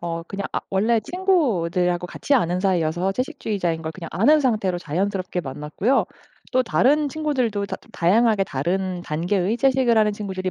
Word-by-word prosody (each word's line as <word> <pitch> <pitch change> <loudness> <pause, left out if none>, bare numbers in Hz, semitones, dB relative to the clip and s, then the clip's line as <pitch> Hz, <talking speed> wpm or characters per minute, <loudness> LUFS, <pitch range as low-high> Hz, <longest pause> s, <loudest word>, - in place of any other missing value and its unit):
어 170 -1 -4
그냥 195 0 -4
아 - - -1
원래 220 +4 +2
친구들하고 185 - 0
같이 280 - -1
아는 180 -7 +1
사이여서 180 -1 +1
채식주의자인 205 - -2
걸 160 - -4
그냥 170 -2 -8
아는 295 +10 +4
상태로 210 -9 0
자연스럽게 185 +2 -2
만났고요. 150 - -1 0.5
또 255 0 +3
다른 285 +5 +2
친구들도 255 -9 -1
다 - - -5
좀 - - -21
다양하게 210 +3 +3
다른 180 +5 -2
단계의 180 +7 -1
채식을 260 -3 +3
하는 210 -1 +3
친구들이 190 -3 -4
195 Hz, 395 characters per minute, -22 LUFS, 175-240 Hz, 0.5 s, 아는